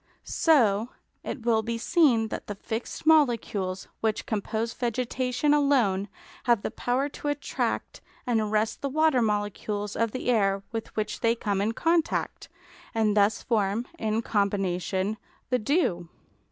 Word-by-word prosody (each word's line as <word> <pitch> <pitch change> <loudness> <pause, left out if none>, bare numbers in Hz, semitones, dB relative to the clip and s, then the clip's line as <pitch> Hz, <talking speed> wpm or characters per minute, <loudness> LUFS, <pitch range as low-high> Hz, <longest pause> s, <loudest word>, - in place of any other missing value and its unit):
So 235 -8 +3 0.3
it 235 - -6
will 225 -2 +3
be 230 +1 -3
seen 240 -3 +3
that - - -6
the 205 - -4
fixed 225 +8 -5
molecules 230 -11 +2
which 220 -1 -1
compose 220 +2 -2
vegetation 250 +3 0
alone 250 -10 +2 0.4
have 235 -4 +3
the - - -2
power 250 +5 0
to 290 - -7
attract 290 0 -2 0.2
and 235 -3 +2
arrest 215 +1 0
the 280 - -1
water 310 -2 +3
molecules 205 -1 -2
of 230 0 +1
the 250 +1 -1
air 195 -3 +2
with 225 -1 -4
which 215 -1 -2
they 230 0 +2
come 205 -4 -1
in 215 +3 0
contact, 330 +5 0 0.5
and 215 -2 +2
thus 205 0 +3
form, 215 0 0
in 220 +1 0
combination, 195 -1 0 0.3
the 250 - +3
dew. 210 - 0
225 Hz, 140 wpm, -27 LUFS, 205-250 Hz, 0.5 s, So